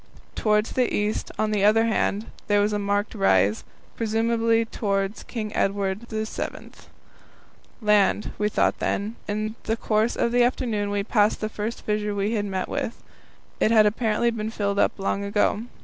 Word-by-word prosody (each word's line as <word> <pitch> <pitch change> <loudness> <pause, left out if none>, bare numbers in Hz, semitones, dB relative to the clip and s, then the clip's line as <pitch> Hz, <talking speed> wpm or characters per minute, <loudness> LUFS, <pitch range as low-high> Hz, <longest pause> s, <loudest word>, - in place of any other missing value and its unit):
Towards 210 0 +1
the 250 -2 +1
east, 210 +1 -1
on 215 0 0
the 205 -2 +1
other 220 +2 +5
hand, 220 -1 0 0.2
there 205 0 +3
was 205 +1 +1
a 210 - 0
marked 205 +1 -1
rise 105 - +2 0.3
presumably 230 0 +1
towards 200 -2 -2
King 215 -3 -5
Edward 195 +2 -1
VII. 220 -1 -4 1.1
Land, 210 -1 +3
we 210 0 +1
thought - - +1
then. 210 +3 -2
In 215 +1 -2
the 225 +1 0
course 220 +1 +1
of 235 - 0
the 245 0 +3
afternoon 230 -4 0
we 205 0 -1
passed 210 0 +2
the 215 - -2
first 220 +2 -5
fissure 210 -1 -1
we 200 +2 0
had 210 -2 0
met 190 -2 -2
with. 230 - -4 0.6
It - - +3
had 220 -2 +6
apparently 220 +2 +1
been 220 -1 -3
filled 200 -2 -1
up - - +2
long 195 0 -1
ago. 205 +2 +1
210 Hz, 165 wpm, -24 LUFS, 205-225 Hz, 1.1 s, had